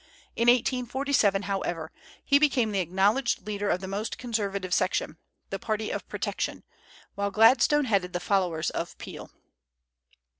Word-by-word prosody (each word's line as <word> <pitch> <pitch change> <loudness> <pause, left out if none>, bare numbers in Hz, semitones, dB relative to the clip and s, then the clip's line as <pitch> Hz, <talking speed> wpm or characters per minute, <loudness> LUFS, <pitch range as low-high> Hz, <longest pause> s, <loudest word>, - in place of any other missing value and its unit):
In 235 - +1
1847, 245 -3 +2
however, 175 -5 -3 0.3
he 280 - +5
became 260 -7 +2
the 200 - 0
acknowledged 200 +9 +1
leader 205 -1 -2
of 180 - 0
the 190 - -5
most 200 +3 -3
conservative 200 -6 -2
section, - - 0 0.3
the - - -3
party 215 -1 -2
of - - -5
protection, - - -3 0.5
while 200 0 -1
Gladstone 245 +7 +5
headed 195 -6 +1
the 175 - -2
followers 180 -5 0
of - - -5
Peel. - - -9
210 Hz, 140 wpm, -27 LUFS, 195-245 Hz, 0.5 s, he